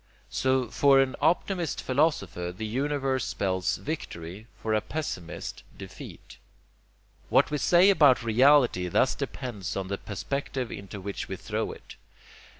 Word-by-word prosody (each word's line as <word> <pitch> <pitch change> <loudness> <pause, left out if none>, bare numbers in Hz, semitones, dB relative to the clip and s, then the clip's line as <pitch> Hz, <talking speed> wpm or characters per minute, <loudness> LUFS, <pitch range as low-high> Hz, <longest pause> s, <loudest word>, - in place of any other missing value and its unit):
So, 130 -1 +1
for 140 0 +5
an 135 -1 +2
optimist 170 +1 +1
philosopher 125 - 0
the 95 +5 -6
universe 135 +2 -1
spells 95 -2 -1
victory, 100 - -6
for 110 - -2
a 110 - +2
pessimist, 120 - -5 0.2
defeat. - - -11 0.9
What - - +4
we 150 - 0
say 175 +7 +5
about 145 -9 +5
reality 120 -4 +4
thus 85 - +2
depends 115 -10 -5
on 95 -1 -4
the 100 - -3
perspective 130 +4 -4
into 100 +1 -7
which 100 +1 -5
we 95 - -4
throw 105 +4 -3
it. - - -12
125 Hz, 135 wpm, -27 LUFS, 100-140 Hz, 0.9 s, for